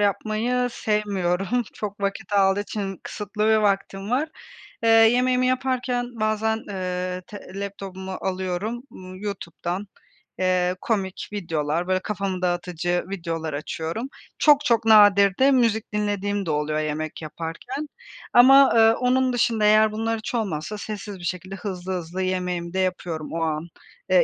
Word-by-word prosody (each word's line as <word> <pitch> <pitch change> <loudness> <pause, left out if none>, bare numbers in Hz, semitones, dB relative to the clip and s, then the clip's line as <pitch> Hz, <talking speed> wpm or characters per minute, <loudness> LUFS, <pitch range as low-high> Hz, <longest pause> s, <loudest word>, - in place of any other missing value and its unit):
yapmayı 220 +5 0
sevmiyorum, 205 0 0
çok 205 -1 -6
vakit 200 +1 -3
aldığı 195 0 +4
için. 200 -3 -4
Kısıtlı 210 +1 -2
bir 220 - +5
vaktim 200 0 0
var. 280 +6 +1 0.5
Eee, 230 - +2
yemeğimi 250 +3 +5
yaparken 255 -1 0
bazen, 215 +1 +1
ııı, 180 -1 -3
te 210 - -9 0.2
laptopumu 190 -1 -6
alıyorum, 190 +5 -3
ımm, 185 0 -10
YouTube'dan, 185 -1 -4 0.5
eee, 185 -1 +2
komik 195 -5 -2
videolar, 165 -3 -2
böyle 185 0 +2
kafamı 195 -2 -3
dağıtıcı 175 -1 -1
videolar 165 -4 -4
açıyorum. 160 - -4 0.3
Çok, 295 -1 +5
çok 235 -3 +2
nadir 200 -3 +6
de 270 +1 +5
müzik 225 -5 +1
dinlediğim 205 -1 -1
de 160 - -1
oluyor 150 +1 0
yemek 155 +1 -3
yaparken. 165 - -6 0.5
Ama, 270 +3 +8
ııı, 225 0 +6
onun 255 0 +2
dışında, 230 -3 +2
eğer 215 +1 +5
bunlar 225 +1 -1
hiç 220 +2 -5
olmazsa, 200 -2 -2
sessiz 205 -2 -6
bir - - -11
şekilde 185 +2 -4
hızlı 190 -2 -5
hızlı 180 +1 -4
yemeğimi 180 -2 -2
de 190 - -1
yapıyorum 175 -4 -2
o 165 - -2
an. 155 +1 -2 0.4
Eee, - - +6
200 Hz, 140 wpm, -24 LUFS, 180-225 Hz, 0.5 s, Ama